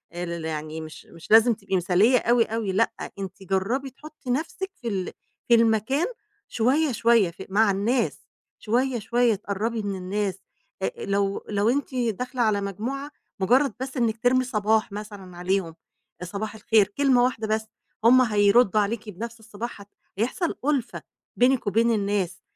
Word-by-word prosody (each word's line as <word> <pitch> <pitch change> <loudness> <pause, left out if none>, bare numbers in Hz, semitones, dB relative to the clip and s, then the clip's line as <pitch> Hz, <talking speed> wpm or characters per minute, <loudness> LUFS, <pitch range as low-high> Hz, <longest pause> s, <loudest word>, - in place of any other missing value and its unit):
ل - - -8 0.2
ل - - -6
يعني 155 0 -4
مش 155 0 -10
مش 165 +4 -14
لازم 225 +2 +7
تبقي 195 -2 -4
مثالية 185 +8 +4
أوي، 240 0 +3
أوي، 220 -3 -2
لأ، 215 +5 +1 0.3
أنتِ 195 0 -7
جرّبي 200 +9 -1
تحطي 300 -1 -12
نفسِك 325 +8 -2
في 235 - -5
ال 190 -4 -2 0.4
في 235 - +6
المكان 230 +6 +2 0.4
شوية، 270 +6 +1
شوية، 230 -5 +3
في 170 - -10
مع 205 +1 +3
الناس 225 +6 0 0.4
شوية، 245 +2 0
شوية، 235 +2 +2
اتقربي 215 +3 -3
من 200 -1 -3
الناس، 190 +1 -3 0.4
آآ 470 -1 -3
لو 200 0 -1
لو 205 +1 +1
أنتِ 275 +1 -1
داخلة 250 +1 -2
على 210 -3 +2
مجموعة، 250 +9 -4 0.3
مجرد 250 +6 +3
بس 265 +1 -5
إنِك 230 0 0
ترمي 255 +1 +4
صباح 220 -2 +1
مثلًا 200 -4 -8
عليهم، 180 -2 -1 0.5
صباح 205 +4 -5
الخير، 215 -1 +3
كلمة 255 +2 +3
واحدة 225 -3 -1
بس، 220 0 0 0.4
هُم 255 +3 +7
هيردوا 210 -1 +4
عليكِ 210 +1 -3
بنفس 230 +4 -7
الصباح، 220 0 -7
ه - - -11 0.3
هيحصل 260 - -1
أُلفة 280 -4 -1 0.3
بينِك 250 -3 +2
وبين 230 +4 +3
الناس، 200 -4 -1
220 Hz, 155 wpm, -25 LUFS, 200-245 Hz, 0.5 s, لازم